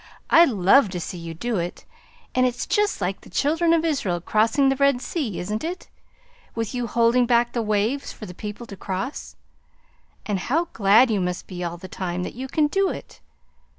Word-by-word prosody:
"I 335 +1 +8
love 210 - +4
to - - -3
see 175 +1 -6
you 165 -1 -7
do 235 +5 -2
it 175 0 -4 0.5
and 255 - +3
it's 245 -1 0
just 415 - 0
like 190 +1 -2
the - - -15
Children 325 +4 +1
of 335 0 +3
Israel 210 - 0
crossing 225 - +2
the 270 - +2
Red 280 -2 +3
Sea, 255 - -3
isn't 210 +4 -3
it? 350 +3 -5 0.7
with 225 0 -3
you 245 -1 -2
holding 235 +2 +3
back 240 0 +2
the 235 - 0
waves 215 +6 0
for 215 - -9
the 180 - -9
people 210 +5 -7
to 205 - -9
cross. 195 +8 -5 0.9
And 205 -3 -1
how 325 - 0
glad 220 +4 +5
you 205 -3 +1
must 180 0 -3
be 180 -1 -6
all 170 0 -4
the 185 - -9
time, 180 -1 -4
that - - -5
you 260 +2 -6
can 300 +3 +2
do 390 +6 +1
it! - - -8
230 Hz, 200 wpm, -23 LUFS, 190-275 Hz, 0.9 s, I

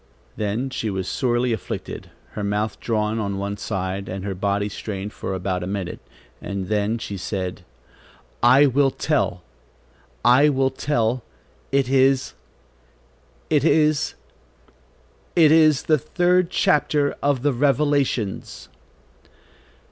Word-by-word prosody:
Then 110 +6 -2
she 110 - -2
was 95 -2 -3
sorely 120 +1 0
afflicted, 110 - -6 0.2
her 105 - -5
mouth 105 +2 -2
drawn 110 -1 -1
on 100 -2 -2
one 100 +1 -3
side, 95 -2 -4
and 95 +1 -5
her 100 - -2
body 100 +2 -1
strained 105 0 -6
for 95 - -4
about 95 0 -2
a 90 - -4
minute, 95 -2 -4 0.4
and 100 -2 -5
then 105 +1 0
she 100 -3 -6
said: 95 -1 -4 0.8
"I 130 +4 +6
will 140 +1 +3
tell. - - -1 0.8
I 135 +5 +6
will 135 -1 +1
tell, 120 -4 -1 0.5
it 135 -2 +2
is, 135 0 +2 1.2
it 150 -3 +3
is, 155 -2 +2 1.2
it 160 -3 +6
is 155 -3 +5
the 155 -2 +2
third 180 +4 +2
chapter 145 -3 +2
of 140 -3 +1
the 145 -1 +2
Revelations." 140 -5 0
120 Hz, 125 wpm, -22 LUFS, 100-140 Hz, 1.2 s, I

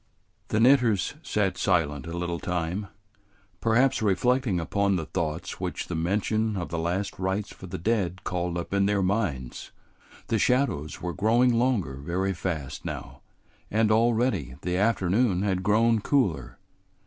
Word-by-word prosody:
The 110 - 0
knitters 120 -5 +4
sat 105 - -1
silent 80 -6 +1
a 85 +1 -5
little 85 -1 -2
time, 90 +3 -2 0.7
perhaps 120 +3 +3
reflecting 110 0 +2
upon 100 +4 +1
the 80 -3 -2
thoughts 80 -2 -3
which - - -4
the 90 - -2
mention 105 +5 0
of 90 - -4
the 85 - -3
last 90 +5 -2
rites 95 +2 -1
for 95 - -11
the - - -5
dead 95 -1 -1
called 90 -1 -2
up 85 - -5
in 100 0 +3
their 100 -1 +1
minds. 90 - -2 0.6
The 110 - 0
shadows 115 - 0
were 90 -1 -2
growing 120 +5 +3
longer 115 - +1
very 90 +7 -1
fast 80 -7 -4
now, - - -7 0.5
and 110 0 +2
already 110 - +2
the 90 0 -1
afternoon 100 0 +2
had 95 -3 0
grown 110 +3 +3
cooler. 120 - 0
95 Hz, 150 wpm, -26 LUFS, 85-110 Hz, 0.7 s, knitters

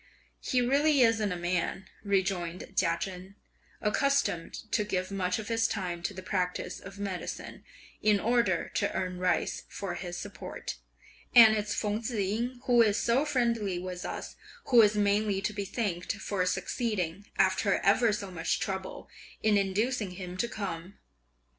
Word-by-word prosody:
"He 250 - +1
really 280 +3 +3
isn't 225 -4 +3
a - - -1
man," 175 +2 -1 0.2
rejoined 190 -3 -1
Chia 170 -3 +2
Chen, 190 +1 -6 0.5
"accustomed 250 -5 0
to 210 - +2
give 185 -2 -2
much 185 -2 0
of 215 - -6
his 225 -1 +2
time 180 -6 -3
to 190 - -2
the 185 - -7
practice 180 -1 -2
of 195 +1 -11
medicine, 200 -3 -5 0.4
in 210 -1 +4
order 230 -7 +1
to - - 0
earn 185 -1 -2
rice 180 -1 0
for 195 -3 -4
his 175 -1 -5
support: 205 +2 -6 0.6
and 225 -2 +10
it's 210 -1 -1
Feng 210 +1 -1
Tzu 235 0 -3
ying, 230 +6 -1
who 245 -2 +5
is 210 -2 +4
so 255 +5 +2
friendly 235 -9 0
with 180 0 -5
us, - - -5 0.3
who 245 -3 +8
is 210 -1 +4
mainly 205 -1 +2
to 210 +2 -2
be 200 -1 -3
thanked 195 -4 -2
for 200 -3 -2
succeeding, 190 -1 -2
after 195 +1 +3
ever 220 +3 +3
so 200 -2 -4
much 165 -2 -1
trouble, 190 -1 -4 0.4
in 215 -1 +4
inducing 205 +1 0
him 180 -2 -6
to 235 - 0
come. 190 -4 -5
200 Hz, 160 wpm, -29 LUFS, 185-225 Hz, 0.6 s, and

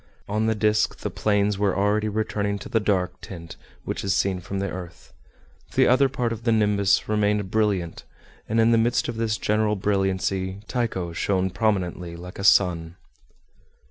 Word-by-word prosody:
On 110 +2 0
the 110 - +1
disc, 105 0 +1
the - - -3
plains 105 -1 +1
were 100 -2 +1
already 105 +2 +1
returning 105 -1 -1
to 100 - -9
the 115 - +2
dark 95 -4 -1
tint 85 -3 -9 0.3
which - - -4
is 95 0 +1
seen 95 -1 +1
from 90 +3 -6
the 100 0 -1
earth. 90 -2 -9 0.6
The - - +5
other 135 +2 +4
part 125 -3 -1
of 115 - -8
the 115 - +2
nimbus 105 -3 +2
remained 105 -2 0
brilliant, 100 -6 0 0.5
and 110 +1 +1
in 115 +1 +4
the 115 - +4
midst 120 +1 +1
of 120 - -4
this 110 -1 0
general 105 0 +1
brilliancy 95 -1 -1
Tycho 95 -9 -2
shone 95 +2 0
prominently 90 -4 -1
like 90 +2 -10
a - - -4
sun. 85 -4 +3
100 Hz, 175 wpm, -24 LUFS, 95-110 Hz, 0.6 s, The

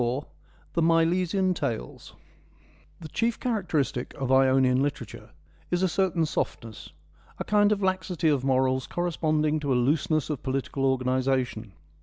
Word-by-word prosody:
— - - -32
The 170 - +1
Milesian 175 +3 +2
Tales 60 - -5 0.9
The 160 - -7
chief 230 +8 -1
characteristic 175 - -2
of 135 -2 -3
Ionian 130 -1 +4
literature 145 +1 -4 0.4
is 175 +1 0
a - - +4
certain 175 -2 +1
softness, 115 -7 -4 0.5
a - - -3
kind 205 0 +3
of 205 -1 0
laxity 185 -3 0
of 140 -4 +1
morals 130 -1 +1
corres 175 -1 -3
ponding 155 -1 +1
to 140 -2 -2
a - - +3
looseness 150 +4 +1
of 145 - -4
political 135 +1 -2
organisation. 130 -4 -1
150 Hz, 140 wpm, -26 LUFS, 130-175 Hz, 0.9 s, Ionian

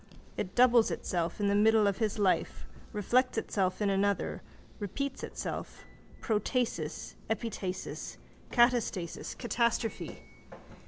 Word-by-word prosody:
It 185 - -4
doubles 245 -2 +6
itself 170 0 -2
in 205 - +1
the 200 - +3
middle 215 +1 +5
of 200 +1 +1
his 220 -1 0
life, 195 -3 +1 0.3
reflects 245 +5 +2
itself 195 -2 0
in 200 - +2
another, 200 0 0 0.4
repeats 270 +7 -3
itself, - - -5 0.4
protasis, 210 - -1 0.2
epitasis, 215 -5 -3 0.3
catastasis, 240 -8 +1
catastrophe. 235 -1 -1
215 Hz, 105 wpm, -31 LUFS, 195-235 Hz, 0.4 s, doubles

